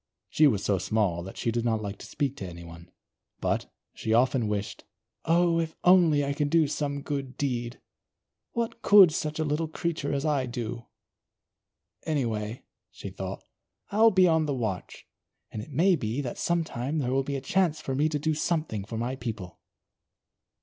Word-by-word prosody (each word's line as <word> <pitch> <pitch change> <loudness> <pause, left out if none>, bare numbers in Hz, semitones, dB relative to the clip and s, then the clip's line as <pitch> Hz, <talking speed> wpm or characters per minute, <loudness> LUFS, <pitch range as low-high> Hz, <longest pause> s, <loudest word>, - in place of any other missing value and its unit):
She 155 - +5
was 105 -7 +1
so 100 -2 +1
small 100 -6 0
that 95 +2 -9
she 115 - -1
did 120 0 -1
not 115 -2 +1
like 100 -1 -6
to - - -10
speak 140 -2 -2
to 95 - -5
anyone. 85 0 -11 0.5
But, - - -1 0.2
she 110 - 0
often 125 -1 +3
wished: 105 -1 -3 0.4
"Oh, 170 0 +3
if 160 -1 -3
only 170 -6 +5
I 140 - -1
could 145 0 -1
do 165 0 +4
some 140 -1 -3
good 135 -3 -4
deed! 120 -3 -2 0.7
What 235 -1 -3
could 200 -8 +8
such 155 -1 -3
a 160 - 0
little 155 +2 -1
creature 155 -2 -3
as 140 0 -1
I 140 -4 +1
do? 120 -1 -5 1.2
Anyway," 115 -7 -2 0.3
she - - -9
thought, - - -6 0.5
"I'll 220 +3 +6
be 185 -3 +5
on 160 -2 +2
the 140 - -1
watch, 110 -7 -4 0.5
and 105 - -5
it 110 - -10
may 175 +7 +3
be 115 -2 -3
that 125 -4 -5
some 170 -1 +1
time 140 0 -3
there 130 -4 0
will 135 +1 +2
be 140 +1 -3
a - - -1
chance 160 +3 +1
for 135 -3 -4
me 150 +4 +2
to 150 - -1
do 155 +2 0
something 155 - -1
for 110 +3 -6
my 120 +3 -2
people." 110 -8 -6
140 Hz, 185 wpm, -27 LUFS, 115-160 Hz, 1.2 s, could